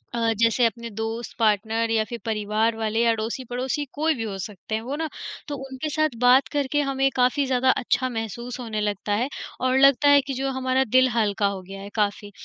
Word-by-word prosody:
अ, 230 Hz, -1 st, +1 dB
जैसे 230 Hz, +1 st, +3 dB
अपने 230 Hz, +1 st, -2 dB
दोस्त, 225 Hz, +2 st, -5 dB
पार्टनर 225 Hz, +1 st, +1 dB
या 220 Hz, -1 st, +2 dB
फिर 235 Hz, -, -5 dB
परिवार 215 Hz, +1 st, 0 dB
वाले 220 Hz, 0 st, -1 dB
या 235 Hz, -, +4 dB
अड़ोसी-पड़ोसी 245 Hz, +5 st, -3 dB
कोई 315 Hz, +2 st, +1 dB
भी 230 Hz, -, -4 dB
हो 200 Hz, -3 st, -4 dB
सकते 210 Hz, +2 st, -5 dB
हैं, 220 Hz, -, -2 dB
वो 260 Hz, +5 st, -4 dB
ना 320 Hz, +1 st, -2 dB, 0.4 s
तो 290 Hz, -, -3 dB
उनके 265 Hz, +4 st, -4 dB
साथ 310 Hz, +1 st, +1 dB
बात 250 Hz, +2 st, +5 dB
करके 290 Hz, 0 st, +1 dB
हमें 270 Hz, -1 st, +1 dB
काफ़ी 255 Hz, +3 st, +2 dB
ज़्यादा 260 Hz, 0 st, +2 dB
अच्छा 255 Hz, 0 st, 0 dB
महसूस 235 Hz, +2 st, -5 dB
होने 220 Hz, -3 st, -3 dB
लगता 205 Hz, 0 st, -2 dB
है 230 Hz, +5 st, +1 dB, 0.3 s
और 255 Hz, 0 st, +2 dB
लगता 275 Hz, +1 st, +5 dB
है 285 Hz, 0 st, +7 dB
कि 275 Hz, 0 st, -5 dB
जो 270 Hz, +1 st, -2 dB
हमारा 260 Hz, 0 st, +1 dB
दिल 255 Hz, +2 st, +4 dB
हल्का 210 Hz, -2 st, +1 dB
हो 195 Hz, -1 st, -4 dB
गया 195 Hz, +1 st, -10 dB
है 200 Hz, -, -8 dB
काफ़ी। 205 Hz, -1 st, -1 dB
235 Hz, 205 wpm, -24 LUFS, 220-265 Hz, 0.4 s, है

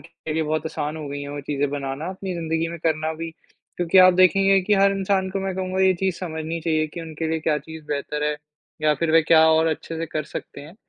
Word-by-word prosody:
के 165 Hz, -1 st, -8 dB
लिए 160 Hz, -, +1 dB
बहुत 155 Hz, +1 st, -1 dB
आसान 155 Hz, -1 st, -4 dB
हो 155 Hz, -2 st, -6 dB
गई 145 Hz, 0 st, -5 dB
हैं 140 Hz, -, -6 dB
वो 145 Hz, 0 st, -5 dB
चीज़ें 145 Hz, 0 st, -1 dB
बनाना, 140 Hz, +2 st, -4 dB
अपनी 190 Hz, 0 st, -5 dB
ज़िंदगी 165 Hz, 0 st, -1 dB
में 170 Hz, 0 st, -7 dB
करना 155 Hz, 0 st, 0 dB
भी। 165 Hz, +1 st, -5 dB, 0.5 s
क्योंकि 175 Hz, +1 st, +3 dB
आप 185 Hz, 0 st, +8 dB
देखेंगे 195 Hz, +1 st, +5 dB
कि 205 Hz, +3 st, +2 dB
हर 195 Hz, 0 st, +4 dB
इंसान 190 Hz, -1 st, 0 dB
को 195 Hz, +1 st, -3 dB
मैं 190 Hz, -1 st, -3 dB
कहूँगा 185 Hz, 0 st, -2 dB
ये 190 Hz, 0 st, +4 dB
चीज़ 190 Hz, -3 st, 0 dB
समझनी 160 Hz, -1 st, -4 dB
चाहिए 155 Hz, -1 st, +1 dB
कि 170 Hz, -, -5 dB
उनके 160 Hz, 0 st, -5 dB
लिए 160 Hz, 0 st, -1 dB
क्या 155 Hz, -1 st, +1 dB
चीज़ 160 Hz, +1 st, -11 dB
बेहतर 150 Hz, +1 st, -2 dB
है 150 Hz, 0 st, 0 dB, 0.5 s
या 155 Hz, -1 st, +4 dB
फ़िर 160 Hz, +3 st, -1 dB
वह 165 Hz, -, +7 dB
क्या 160 Hz, -1 st, +7 dB
और 160 Hz, 0 st, +3 dB
अच्छे 160 Hz, +1 st, -3 dB
से 165 Hz, -, -3 dB
कर 155 Hz, -, -1 dB
सकते -, -, -6 dB
हैं? 150 Hz, +4 st, -12 dB
160 Hz, 250 wpm, -23 LUFS, 155-185 Hz, 0.5 s, आप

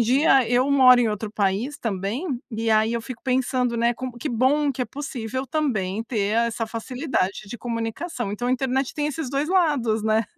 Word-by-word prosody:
dia 260 Hz, +1 st, +4 dB
eu 250 Hz, +3 st, +2 dB
moro 255 Hz, -3 st, +7 dB
em 235 Hz, -, +2 dB
outro 210 Hz, 0 st, -3 dB
país 210 Hz, +8 st, 0 dB
também, 215 Hz, -, -3 dB, 0.2 s
e 225 Hz, 0 st, -1 dB
aí 220 Hz, +2 st, +3 dB
eu 235 Hz, -, -1 dB
fico 255 Hz, 0 st, -8 dB
pensando, 255 Hz, -2 st, 0 dB
né, 235 Hz, +1 st, +2 dB
como 255 Hz, -1 st, -6 dB
que 300 Hz, -, -3 dB
bom 275 Hz, +4 st, +2 dB
que 255 Hz, -, -7 dB
é -, -, -1 dB
possível 260 Hz, -2 st, -5 dB
também 225 Hz, -9 st, -1 dB
ter 215 Hz, -4 st, -1 dB
essa 225 Hz, -1 st, -3 dB
facilidade 230 Hz, -3 st, -2 dB
de 240 Hz, -, -7 dB
comunicação. 230 Hz, -, -4 dB
Então 245 Hz, +4 st, -2 dB
a -, -, +2 dB
internet 265 Hz, 0 st, -1 dB
tem 295 Hz, -1 st, -1 dB
esses 300 Hz, -2 st, -4 dB
2 285 Hz, +3 st, -1 dB
lados, 285 Hz, -, +2 dB
né. 220 Hz, 0 st, +2 dB
245 Hz, 190 wpm, -24 LUFS, 225-270 Hz, 0.2 s, moro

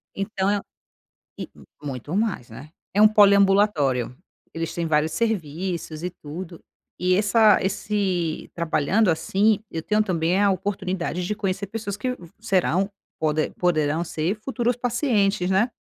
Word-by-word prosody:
Então 195 Hz, -1 st, -1 dB
é 205 Hz, -, +2 dB
um -, -, -4 dB, 0.8 s
e -, -, -6 dB, 0.3 s
u 145 Hz, -, -7 dB
muito 135 Hz, +5 st, -5 dB
mais, 205 Hz, -, -1 dB
né. 130 Hz, +7 st, -11 dB, 0.2 s
É 205 Hz, -, +3 dB
um 215 Hz, -, +9 dB
poliambulatório. 200 Hz, -, +4 dB, 0.4 s
Eles 165 Hz, -1 st, -4 dB
têm 170 Hz, -, -2 dB
vários 155 Hz, 0 st, +1 dB
serviços, 175 Hz, -6 st, -2 dB
e 180 Hz, -, -2 dB
tudo. 165 Hz, +2 st, -9 dB, 0.4 s
E 180 Hz, +1 st, +2 dB
essa 210 Hz, +1 st, +5 dB
esse 190 Hz, -4 st, -2 dB
trabalhando 170 Hz, +5 st, +1 dB
assim, 195 Hz, +6 st, +2 dB
eu 160 Hz, -, -3 dB
tenho 215 Hz, +5 st, +1 dB
também 175 Hz, -1 st, 0 dB
a 200 Hz, -1 st, +4 dB
oportunidade 185 Hz, -2 st, -2 dB
de 210 Hz, -, -2 dB
conhecer 195 Hz, -1 st, -2 dB
pessoas 205 Hz, -1 st, -5 dB
que 250 Hz, +4 st, -2 dB
vã 175 Hz, -, -13 dB
serão 195 Hz, -3 st, +1 dB, 0.3 s
pode 155 Hz, 0 st, 0 dB
poderão 160 Hz, -2 st, 0 dB
ser 165 Hz, +3 st, -2 dB
futuros 240 Hz, +2 st, -1 dB
pacientes, 210 Hz, -6 st, +1 dB
né. 205 Hz, +6 st, +2 dB
190 Hz, 150 wpm, -24 LUFS, 165-210 Hz, 0.8 s, um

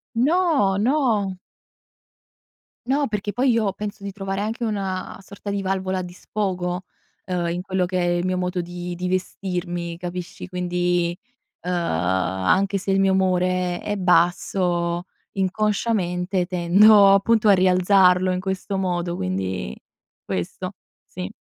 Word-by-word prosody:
No, 280 Hz, -, +2 dB
no. 215 Hz, -5 st, +1 dB, 1.5 s
No, 280 Hz, +2 st, +1 dB
perché 210 Hz, -1 st, -3 dB
poi 255 Hz, +3 st, +2 dB
io 225 Hz, -4 st, +1 dB
penso 210 Hz, 0 st, -6 dB
di 200 Hz, -, -5 dB
trovare 195 Hz, 0 st, -4 dB
anche 225 Hz, +3 st, -2 dB
una 195 Hz, -4 st, -3 dB
sorta 200 Hz, +1 st, -8 dB
di 200 Hz, 0 st, -1 dB
valvola 190 Hz, -1 st, -1 dB
di 175 Hz, -, -8 dB
sfogo, 180 Hz, -3 st, -3 dB, 0.4 s
uhm, 180 Hz, -2 st, -1 dB
in 175 Hz, +1 st, -2 dB
quello 185 Hz, -1 st, -1 dB
che 185 Hz, +1 st, -2 dB
è 175 Hz, -1 st, +1 dB
il 175 Hz, -, -2 dB
mio 185 Hz, 0 st, 0 dB
modo 180 Hz, 0 st, -1 dB
di 175 Hz, 0 st, -6 dB
di 180 Hz, +1 st, -3 dB
vestirmi, 175 Hz, -2 st, -3 dB
capisci? 180 Hz, 0 st, -6 dB
Quindi, 175 Hz, -1 st, 0 dB, 0.5 s
uhm, 180 Hz, -, -3 dB
anche 95 Hz, -, +1 dB
se 195 Hz, -, -4 dB
il 195 Hz, -, +3 dB
mio 195 Hz, 0 st, +3 dB
umore 185 Hz, -1 st, +1 dB
è 205 Hz, -, -3 dB
basso 175 Hz, -1 st, +1 dB, 0.3 s
inconsciamente 190 Hz, -2 st, 0 dB
tendo 195 Hz, +3 st, +6 dB
appunto 215 Hz, +2 st, +3 dB
a 205 Hz, -, +8 dB
rialzarlo 185 Hz, 0 st, +4 dB
in 180 Hz, -, -1 dB
questo 190 Hz, +1 st, -3 dB
modo, 175 Hz, -2 st, -1 dB
quindi 95 Hz, -7 st, -3 dB, 0.5 s
questo, 90 Hz, -1 st, -4 dB, 0.3 s
sì. 90 Hz, 0 st, -6 dB
185 Hz, 135 wpm, -23 LUFS, 175-200 Hz, 1.5 s, a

